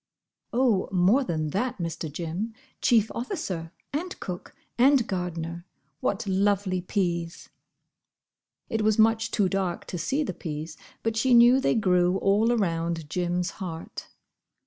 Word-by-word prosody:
"Oh, 235 -6 +2
more 195 +9 +4
than 155 -8 -2
that, 230 - -1
Mr. 165 -3 -4
Jim. 175 +8 -4 0.3
Chief 225 -4 +3
officer, 200 - -4 0.2
and 355 +6 -3
cook, 180 -1 -7 0.2
and 260 0 +5
gardener—what 170 - -4
lovely 195 -1 +1
peas!" 175 -3 -2 1.2
It 225 - -1
was 215 0 +2
much 225 0 +3
too 205 -4 +2
dark 185 -2 -2
to 180 - -5
see 270 - 0
the - - -3
peas, 155 -1 -6 0.3
but 225 -1 0
she 245 +2 +4
knew 240 +2 +7
they 270 - +2
grew 180 -3 +3
all 205 +4 +3
around 165 -7 -1
Jim's 180 0 -1
heart. 165 -3 -6
190 Hz, 130 wpm, -26 LUFS, 170-225 Hz, 1.2 s, knew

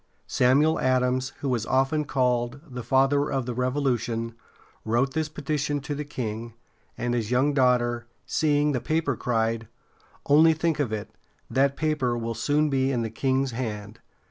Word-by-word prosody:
Samuel 145 +6 +3
Adams, 130 0 +1
who 135 -3 0
is 115 -3 -1
often 135 +3 +1
called 125 -1 0
the 125 -3 -6
"Father 135 +4 +2
of 135 -2 -1
the 125 - -3
Revolution," 120 -3 -1 0.5
wrote 120 +5 +1
this 160 -1 -1
petition 150 -1 -2
to 145 +2 -4
the 145 +1 -3
king; 115 -5 -5 0.4
and 120 0 -1
his 115 -3 -1
young 130 +4 +2
daughter, 120 -3 +2 0.2
seeing 150 -1 +2
the 125 -4 -1
paper, 155 -4 0
cried: 115 -1 -1 0.6
"Only 160 +3 +6
think 160 0 0
of 135 -7 0
it; 105 -2 -4 0.4
that 140 +1 +2
paper 150 -6 0
will 115 0 -3
soon 145 +7 +1
be 135 -1 +1
in 120 -3 0
the 115 - -4
king's 130 +2 0
hand!" 110 -3 -5
130 Hz, 160 wpm, -26 LUFS, 120-145 Hz, 0.6 s, Only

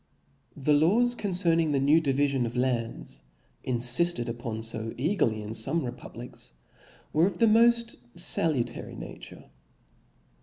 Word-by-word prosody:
^ - - -13
The 150 - +2
laws 210 +12 +2
concerning 175 -7 +1
the 140 - +1
new 145 +4 +3
divifion 140 -3 0
of 115 - -8
lands, 125 -2 -4 0.4
infifted 125 +4 +3
upon 115 -1 -6
fo 115 0 -5
eagerly 125 - -1
ii) - - -9
fpme 135 +8 -1
republics, 120 - -10 0.6
were 160 +4 +3
of 190 -3 -6
the 230 - +3
moft 235 +1 +3 0.2
faiutary 155 -6 +1
nature. - - -12
145 Hz, 125 wpm, -26 LUFS, 120-175 Hz, 0.6 s, new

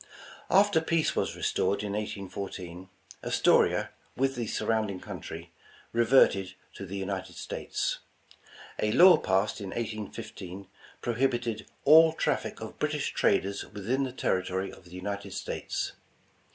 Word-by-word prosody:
After 195 -3 +5
peace 160 -1 +1
was - - -1
restored 100 +1 0
in 100 -1 -3
1814, 95 -3 -5 0.3
Astoria, - - +3 0.3
with 135 +1 +2
the 120 -3 -3
surrounding 110 -5 -1
country, 85 -1 -8 0.4
reverted 115 -5 +4 0.2
to 100 - -8
the 100 +2 -5
United 95 -1 -4
States. - - -3 0.8
A 105 - +1
law 175 +5 +8
passed 95 -3 0
in 100 - -5
1815 110 -3 -6 0.4
prohibited 120 -2 -1 0.2
''all 160 +2 +8
traffic - - -1
of - - -8
British - - -1
traders 100 +1 +1
within 105 +6 -1
the 130 - -3
territory 95 -5 -1
of 90 - -15
the - - -15
United 100 +3 -5
States." - - -3
105 Hz, 125 wpm, -29 LUFS, 95-125 Hz, 0.8 s, law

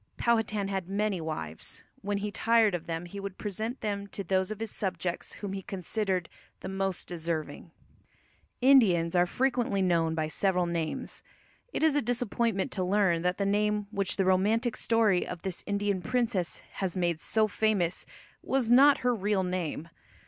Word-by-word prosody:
Powhatan 225 -4 +1
had 190 -2 -3
many 200 -2 0
wives; 80 - -4 0.2
when 205 0 -1
he 205 +1 -3
tired 225 -1 +3
of 175 -2 -4
them 165 +1 -3
he 200 +3 -8
would 195 -1 -6
present 220 +5 -4
them 200 -2 -2
to 200 - -5
those 190 0 +1
of 215 -1 -5
his 225 -1 -4
subjects 185 -3 -3
whom 200 -2 -6
he 195 - -4
considered 190 -1 -2 0.3
the - - -6
most 190 -1 -2
deserving. 165 -2 -4 0.9
Indians 195 -11 +5
are 175 0 +4
frequently 245 -3 0
known 165 -3 +2
by 155 -1 0
several 180 +2 +1
names. 170 -2 -3 0.5
It - - -2
is 315 -2 +4
a 290 - +3
disappointment 235 -3 0
to 185 - 0
learn 185 -3 +2
that 180 +1 0
the 200 - 0
name 210 +1 +1
which 200 -3 -1
the 195 - +2
romantic 215 +6 +2
story 220 -5 +2
of 180 -2 -7
this 190 -2 -4
Indian 200 -2 0
princess 230 -6 -1 0.2
has 190 -1 -1
made 170 -3 0
so 220 0 +2
famous 205 -5 0 0.3
was 260 -3 0
not 275 +3 +7
her 250 - +4
real 205 -2 0
name. 180 -3 -3
195 Hz, 170 wpm, -29 LUFS, 180-215 Hz, 0.9 s, not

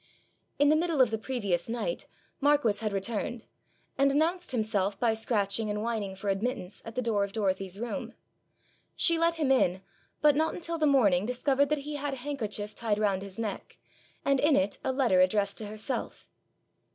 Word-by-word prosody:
In 290 +1 +4
the 305 - +5
middle 330 -2 0
of 250 -4 +5
the 220 - -1
previous 205 -8 -2
night, 240 - -3 0.3
Marquis 285 -8 +3
had 215 -1 -1
returned, 215 +3 -3 0.5
and 275 0 +5
announced 335 +5 +1
himself 210 -5 0
by 235 -2 +3
scratching 220 -1 -1
and 210 +1 -2
whining 215 -4 -2
for 200 +1 -4
admittance 200 -1 -3
at 225 - -8
the 255 - -1
door 215 -3 +1
of 200 0 -4
Dorothy's 195 -2 -1
room. 235 +1 -4 0.8
She 335 -1 +3
let 335 0 +3
him 300 -5 +1
in, 190 -8 +2 0.4
but 295 -2 +5
not 315 +2 +1
until 335 -1 -4
the 305 - +3
morning 210 -9 +4
discovered 275 +3 +1
that 300 - +2
he 295 0 -4
had 285 -1 -2
a 250 - -10
handkerchief 215 -7 -3
tied 220 -3 -1
round 200 -3 +1
his 195 -1 -9
neck, 220 -3 -5 0.5
and 275 -1 +3
in 295 +1 +4
it 190 +2 +1
a - - 0
letter 250 -9 +3
addressed 200 +1 +1
to 215 - -5
herself. 215 +5 -4
230 Hz, 185 wpm, -29 LUFS, 205-280 Hz, 0.8 s, the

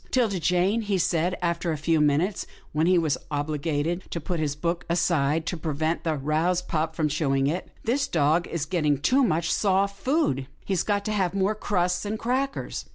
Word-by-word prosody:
" - - -31
'Tilda 225 -7 +1
Jane," 180 +7 +2
he 205 -3 0
said, 175 +1 +1
after 170 0 0
a 155 - -2
few 155 +1 +1
minutes, 150 +6 +1 0.2
when 155 +2 +1
he 185 0 +5
was 155 -5 +1
obliged 150 +3 -2
to 170 - -3
put 170 +2 -3
his 150 -2 -1
book 170 +3 -2
aside 165 -3 +1
to 175 - -2
prevent 160 0 -2
the 160 -2 0
aroused 160 +6 0
pup 160 0 -1
from 155 -2 +1
chewing 140 -3 +1
it. 160 +6 -2
" - - -27
This 265 +5 +1
dog 160 +2 +2
is 165 -4 -3
getting 155 -6 +1
too 255 - +3
much 170 -6 +1
soft 200 0 +1
food. 225 - 0 0.2
He's 190 -3 +1
got 205 -1 -1
to 215 - -1
have 190 -3 0
more 195 +2 +2
crusts 180 -4 0
and 210 +1 -3
crackers." 260 +5 -2
170 Hz, 200 wpm, -26 LUFS, 155-195 Hz, 0.2 s, he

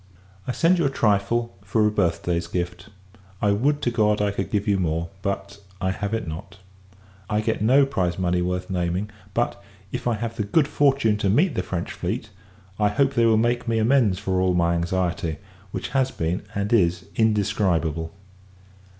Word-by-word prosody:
I - - 0
send 170 +6 +3
you 165 - +2
a - - +3
trifle, 115 -1 +1
for 105 +2 +2
a 105 - +3
birth 90 -6 0
day's 85 -1 -1
gift. 90 +4 -4 0.5
I 105 - +2
would 140 +9 +1
to 120 - +1
God, 105 -3 +2
I 105 0 +1
could 95 -1 -3
give 105 0 -1
you 100 -2 +2
more; 85 -1 -1
but, 100 0 -4 0.2
I 95 - 0
have 100 +1 -3
it 110 -5 -4
not! 90 +4 -7 0.7
I 105 -1 +1
get 110 0 -1
no 130 +6 +5
prize 95 -11 -1
money 90 -1 +1
worth 90 +1 -2
naming; 90 +3 -1 0.2
but, 120 -4 -1 0.3
if 125 0 -3
I 120 - +2
have 115 +1 -4
the 105 - 0
good 140 +9 +2
fortune 135 -7 +2
to 100 -2 0
meet 150 - +3
the - - -1
French 90 -1 -4
fleet, 110 - -4 0.5
I 105 - +4
hope 135 +6 +2
they 120 -3 +3
will 110 -1 +4
make 120 +2 +1
me 115 -1 +1
amends 110 -4 +3
for 95 -2 -1
all 90 -1 +2
my 85 -1 +2
anxiety; 85 -2 -1 0.3
which - - -5
has 135 0 +1
been, 85 -2 -2
and 100 +2 -1
is, 90 -4 +2
indescribable. 90 -7 +1
100 Hz, 190 wpm, -24 LUFS, 90-115 Hz, 0.7 s, no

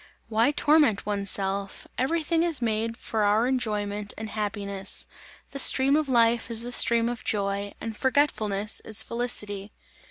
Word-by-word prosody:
"Why 225 +3 +2
torment 295 -7 +3
one's 200 -1 -2
self? 195 0 -2
Every 315 +6 -1
thing 330 +2 +1
is 335 -4 +2
made 225 -1 -1
for 220 - -3
our 210 +3 +3
enjoyment 210 -5 -2
and 220 -1 -6
happiness! 200 -2 0 0.5
The 275 - -6
stream 270 +1 +5
of 305 -2 0
life 235 -1 +3
is 230 0 +2
the 245 - -6
stream 235 -1 +4
of 240 -1 -5
joy, 200 -1 -2
and 225 -1 -6
forgetfulness 215 -6 0
is 220 0 -1
felicity!" 210 -4 -4
225 Hz, 155 wpm, -26 LUFS, 205-250 Hz, 0.5 s, stream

